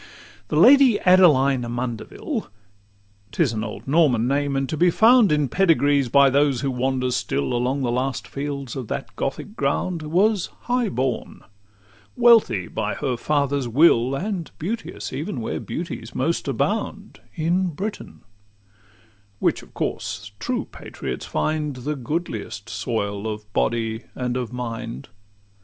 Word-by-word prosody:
II - - -17 0.4
The 150 - -3
Lady 255 - +7
Adeline 145 -8 +5
Amundeville 120 -1 -4 0.8
('T - - +2
is 130 -7 0
an 110 -1 -2
old - - -7
Norman 135 -6 +3
name, 140 +1 0
and 135 0 0
to 155 - -3
be 175 +3 +4
found 225 +2 +5
In 150 -2 +2
pedigrees, 145 -6 +3
by 140 +2 +6
those 140 -2 +2
who 140 - -1
wander 130 0 -1
still 70 - -1
Along 125 +3 0
the 120 - 0
last 130 +2 -2
fields 140 -3 -5
of 130 -4 -5
that - - -5
Gothic - - -4
ground) 165 - -1
Was 185 +6 +2
high 245 -2 0
born, 125 0 -3 0.7
wealthy 230 - +4
by 105 -1 -3
her 135 -4 -1
father's 140 0 0
will, 130 -1 +4
And 185 +1 -3
beauteous, 220 +8 -5
even - - -4
where - - -3
beauties - - -6
most - - -1
abound, - - -2 0.2
In 175 +3 +1
Britain 195 +6 -6 1.2
which - - 0
of - - -18
course 105 0 -4
true 250 - -2
patriots - - -6
find 150 -2 -1
The 140 +4 -3
goodliest 120 - -4
soil 100 -4 -3
of 105 -1 -9
body 115 0 -1
and 125 -1 -2
of 125 -3 -3
mind. 115 - -6
140 Hz, 145 wpm, -23 LUFS, 120-165 Hz, 1.2 s, Lady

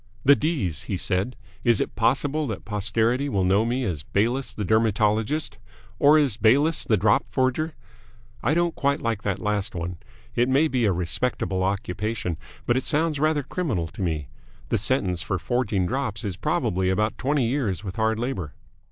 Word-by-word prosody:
"The 140 +2 +8
D's," 135 - -1
he 95 - -2
said. 95 +7 0 0.3
"Is 120 -4 +4
it - - -2
possible 135 +7 +1
that 110 -5 -5
posterity 110 +6 +1
will 100 -7 +1
know 95 +4 +3
me 125 +3 -1
as 85 - -2
Bayliss 120 - 0
the 105 - -4
Dermatologist? 110 +4 +1 0.4
Or 145 +2 +6
as 140 -8 +2
Bayliss 140 +9 +4
the 110 - +2
Drop 105 +2 +3
Forger? 135 +5 0 0.7
I 145 +7 +1
don't 170 -1 +1
quite 140 0 0
like 115 -3 -2
that 100 -3 -1
last 105 0 -1
one. 85 +1 -4 0.4
It 120 +2 +2
may 140 +4 +4
be 130 -5 +1
a 100 - +3
respectable 95 +2 -1
occupation, 95 0 -2 0.3
but 120 - +2
it 130 - -1
sounds 155 -1 +1
rather 155 -1 +2
criminal 130 - -2
to - - -9
me. 80 -5 -2 0.4
The - - +1
sentence 95 -7 0
for 95 - -2
forging 105 -1 0
drops 115 -2 -2
is 100 -4 -3
probably 90 +2 0
about 105 +3 0
twenty 140 -1 +1
years 115 - -1
with 95 +1 -6
hard 110 0 +1
labour." 115 - -3
110 Hz, 175 wpm, -25 LUFS, 95-135 Hz, 0.7 s, The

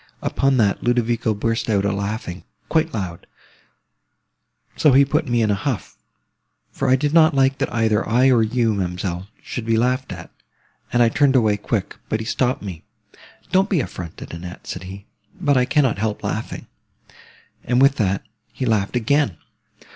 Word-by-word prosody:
Upon 135 -1 +1
that, 105 -4 +2
Ludovico 120 -2 +1
burst 115 +2 -1
out 100 -2 +2
a 100 - +2
laughing, 100 -2 -4 0.3
quite 160 0 +1
loud; 90 -5 -5 1.5
so 150 - +4
he 140 +2 +6
put 150 +2 0
me 120 -2 +2
in 105 - +2
a - - +3
huff, 110 +2 -3 0.8
for 135 - -1
I 130 - +6
did 145 +3 -1
not 160 -2 +5
like 135 0 +2
that 135 - -1
either 110 -2 +1
I 125 +4 +4
or 120 -3 +4
you, 115 0 +1
ma'amselle, 90 -1 -3 0.2
should 125 - -5
be 115 0 +1
laughed 125 +3 0
at; - - -9 0.6
and 120 0 +4
I 115 - +4
turned 140 +2 +3
away 110 -5 +4
quick, 100 -1 -3
but 110 - 0
he 110 - -5
stopped 125 +1 0
me. 90 -6 -7 0.7
'Don't 190 +2 +3
be 185 - +2
affronted, 90 - -6
Annette,' 90 +1 -8
said 90 0 -6
he, 95 +2 -9 0.3
'but 145 - +2
I 125 -1 +3
cannot 135 -7 +2
help 105 0 -2
laughing;' 110 +3 -4 1.0
and 125 0 +1
with 135 +1 +5
that 95 -3 0 0.3
he 130 +2 -4
laughed 110 -2 0
again. 125 - +1
115 Hz, 170 wpm, -21 LUFS, 100-130 Hz, 1.5 s, he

